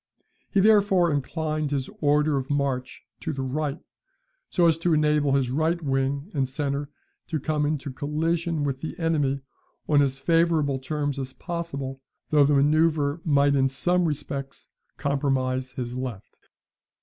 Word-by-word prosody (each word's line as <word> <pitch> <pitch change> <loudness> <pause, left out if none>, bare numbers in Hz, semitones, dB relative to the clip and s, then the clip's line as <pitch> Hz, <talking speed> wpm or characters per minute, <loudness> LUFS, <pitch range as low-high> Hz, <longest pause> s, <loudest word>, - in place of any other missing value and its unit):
He 200 - +2
therefore 195 -4 +4
inclined 155 +2 -1
his 140 -2 -1
order 150 0 +3
of 135 -1 -2
march 140 -3 -2 0.2
to 160 - -3
the 135 -3 -3
right 145 +2 -2 0.7
so 175 - +2
as 165 -1 +3
to 170 -1 +2
enable 150 -2 +2
his 135 -3 +1
right 160 +5 +1
wing 140 +3 -1
and 135 -4 0
centre 140 +1 -2 0.4
to 160 -2 -2
come 150 +1 0
into 145 -3 -3
collision 160 +3 -1
with 135 -2 -2
the 160 - -5
enemy 145 -5 0 0.5
on 145 -2 +4
as 135 -1 +1
favourable 155 -2 +2
terms 145 +1 -2
as 130 -1 -5
possible 140 -7 -5 0.3
though 150 -2 +6
the 145 +1 +3
manoeuvre 150 +1 +2
might 140 -2 +3
in 135 -1 +3
some 175 +7 +1
respects 140 -3 -4 0.3
compromise 130 -2 -1
his 125 -2 -4
left. 125 -6 -6
145 Hz, 150 wpm, -25 LUFS, 135-160 Hz, 0.7 s, though